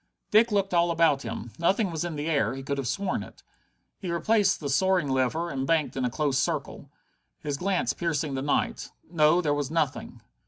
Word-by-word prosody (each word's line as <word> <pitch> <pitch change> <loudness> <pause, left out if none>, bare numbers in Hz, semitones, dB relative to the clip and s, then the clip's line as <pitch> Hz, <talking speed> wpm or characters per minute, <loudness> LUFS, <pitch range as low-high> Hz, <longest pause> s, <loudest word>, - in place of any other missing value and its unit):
Dick 225 +2 +5
looked 195 -2 0
all 170 0 +3
about 165 -4 +3
him. 115 0 -6
Nothing 190 +3 +2
was 160 -1 -3
in 175 -2 -4
the 150 +1 -3
air 145 -4 +1
he 135 - -7
could 140 +1 -2
have 135 - -3
sworn 185 +10 -1
it. - - -12 0.6
He 185 - -5
replaced 205 +5 +2
the 145 - -4
soaring 180 +3 +2
lever 135 +6 0
and 135 -1 -3
banked 160 -2 +1
in 130 - -2
a - - +1
close 140 +1 0
circle, 145 -3 -3 0.5
his 145 -2 -4
glance 185 +4 0
piercing 155 -4 -2
the 135 - -2
night. 145 +1 -1 0.2
No, 160 +1 +4
there 150 -4 +1
was 145 -2 -2
nothing. 155 -4 -2
155 Hz, 200 wpm, -27 LUFS, 140-175 Hz, 0.6 s, Dick